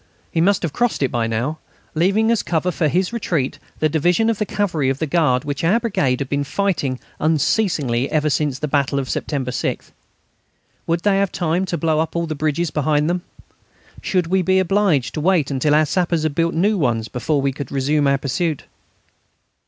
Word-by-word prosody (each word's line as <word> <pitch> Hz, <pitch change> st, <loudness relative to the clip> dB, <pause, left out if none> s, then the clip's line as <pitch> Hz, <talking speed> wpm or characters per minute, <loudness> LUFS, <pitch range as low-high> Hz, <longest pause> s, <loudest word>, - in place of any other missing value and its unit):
He 165 Hz, -, +1 dB
must 195 Hz, +2 st, +2 dB
have 160 Hz, -4 st, -2 dB
crossed 240 Hz, -10 st, 0 dB
it 135 Hz, -, 0 dB
now, 120 Hz, +6 st, -1 dB, 0.3 s
leaving 195 Hz, +7 st, +2 dB
as 230 Hz, -, +2 dB
cover 175 Hz, +1 st, -1 dB
for 165 Hz, -3 st, 0 dB
his 180 Hz, +7 st, 0 dB
retreat 165 Hz, -, -1 dB, 0.2 s
the 155 Hz, -, +2 dB
division 175 Hz, +9 st, +2 dB
of 220 Hz, -, -4 dB
the 210 Hz, -, -1 dB
Cavalry 170 Hz, -10 st, 0 dB
of 135 Hz, -, -1 dB
the 160 Hz, -, -1 dB
Guard 150 Hz, -5 st, +1 dB
which 145 Hz, +1 st, -3 dB
our 190 Hz, +8 st, +3 dB
brigade 140 Hz, -, 0 dB
had 135 Hz, -, -2 dB
been 140 Hz, +1 st, -1 dB
fighting 145 Hz, -6 st, -1 dB, 0.2 s
unceasingly 155 Hz, -, +1 dB
ever 155 Hz, -1 st, +1 dB
since 145 Hz, -2 st, 0 dB
the 150 Hz, -, -3 dB
battle 140 Hz, -1 st, 0 dB
of 135 Hz, -1 st, -2 dB
September 135 Hz, -4 st, -2 dB
6. -, -, -3 dB, 1.0 s
Would 165 Hz, +1 st, 0 dB
they 195 Hz, 0 st, +2 dB
have 200 Hz, -2 st, +1 dB
time 175 Hz, +2 st, 0 dB
to 175 Hz, -2 st, -2 dB
blow 155 Hz, 0 st, +1 dB
up 160 Hz, +1 st, -2 dB
all 170 Hz, 0 st, 0 dB
the 160 Hz, -, -3 dB
bridges 155 Hz, +2 st, -1 dB
behind 150 Hz, +1 st, +1 dB
them? 180 Hz, 0 st, -1 dB, 0.8 s
Should 180 Hz, -3 st, 0 dB
we 185 Hz, +3 st, +1 dB
be 185 Hz, +1 st, +2 dB
obliged 190 Hz, -7 st, +2 dB
to 155 Hz, -, -3 dB
wait 165 Hz, -4 st, +2 dB
until 145 Hz, +2 st, +2 dB
our 155 Hz, 0 st, +4 dB
sappers 170 Hz, 0 st, 0 dB
had 155 Hz, -2 st, 0 dB
built 165 Hz, +2 st, 0 dB
new 200 Hz, +4 st, +2 dB
ones 115 Hz, -6 st, 0 dB
before 140 Hz, +6 st, -1 dB
we 135 Hz, 0 st, +1 dB
could 140 Hz, -2 st, -7 dB
resume 145 Hz, +2 st, +1 dB
our 140 Hz, 0 st, +3 dB
pursuit? 145 Hz, +3 st, -2 dB
155 Hz, 200 wpm, -20 LUFS, 140-180 Hz, 1.0 s, our